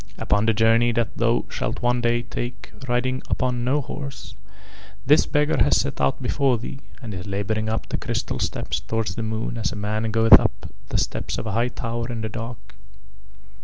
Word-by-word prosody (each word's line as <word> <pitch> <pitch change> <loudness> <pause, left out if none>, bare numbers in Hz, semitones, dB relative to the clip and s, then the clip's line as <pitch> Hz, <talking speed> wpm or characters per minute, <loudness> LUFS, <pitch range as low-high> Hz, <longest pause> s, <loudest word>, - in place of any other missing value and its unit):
"Upon 105 +2 +1
the 115 - +4
journey 115 +2 +4
that 115 -1 -1
thou 115 +1 +1
shalt 115 +2 -3
one 120 0 +2
day 120 0 +1
take 120 0 -6
riding 130 +1 0
upon 125 -1 0
no 135 +4 +2
horse, 135 -6 -7 0.7
this 150 +4 +5
beggar 150 0 +2
has - - +4
set - - -1
out 70 -1 +1
before 135 -3 +2
thee 125 +4 -7 0.2
and 110 -3 -5
is 90 +1 -6
labouring 105 +2 -1
up 110 - -2
the - - -1
crystal - - -2
steps - - -2
towards 110 +4 -2
the - - -4
moon 110 +1 -3
as 110 - -1
a - - -6
man 105 +2 -1
goeth 115 +1 +8
up - - -3 0.2
the - - 0
steps - - -2
of - - -4
a 110 - -2
high 115 +4 +1
tower 120 -1 -4
in 115 -2 -4
the 110 - -3
dark. 115 -2 -7
115 Hz, 195 wpm, -24 LUFS, 110-120 Hz, 0.7 s, goeth